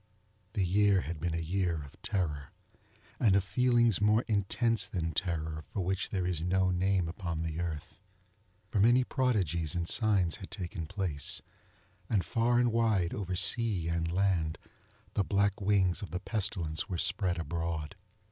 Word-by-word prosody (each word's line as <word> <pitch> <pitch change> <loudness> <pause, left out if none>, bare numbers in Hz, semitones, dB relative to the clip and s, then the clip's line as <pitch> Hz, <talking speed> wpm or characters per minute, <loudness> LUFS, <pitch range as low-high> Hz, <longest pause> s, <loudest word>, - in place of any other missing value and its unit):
The 100 -4 +1
year 100 +1 +3
had 85 -1 -5
been 85 0 -1
a - - 0
year 85 -1 -1
of 70 - -15
terror, 75 -8 -2 0.7
and 105 -5 +4
of 100 - +3
feelings 120 0 +3
more 105 +3 +4
intense 115 +2 +1
than 80 -3 -2
terror 80 -2 -2
for 80 +7 -5
which 95 +2 -1
there 95 -3 -1
is 90 -3 -1
no 95 +2 +2
name 90 -1 +1
upon 85 -2 -4
the 80 0 -3
earth. 85 -1 -5 0.7
For 105 - +1
many 120 +5 +5
prodigies 95 - 0
and 85 -1 -1
signs 100 -5 +2
had 95 -4 -9
taken 90 -4 -5
place, 90 -6 -1 0.7
and 100 -6 +1
far 120 0 +2
and 120 -1 +3
wide, 110 -7 +2
over 95 -3 -3
sea 95 -2 +1
and 85 0 -1
land, 90 -4 +1 0.6
the 100 - +1
black 100 0 +1
wings 95 -3 +2
of 100 - -6
the 90 +3 -3
Pestilence 95 -5 -2
were 90 - -2
spread 90 0 +1
abroad. 85 +1 -3
95 Hz, 160 wpm, -31 LUFS, 85-105 Hz, 0.7 s, many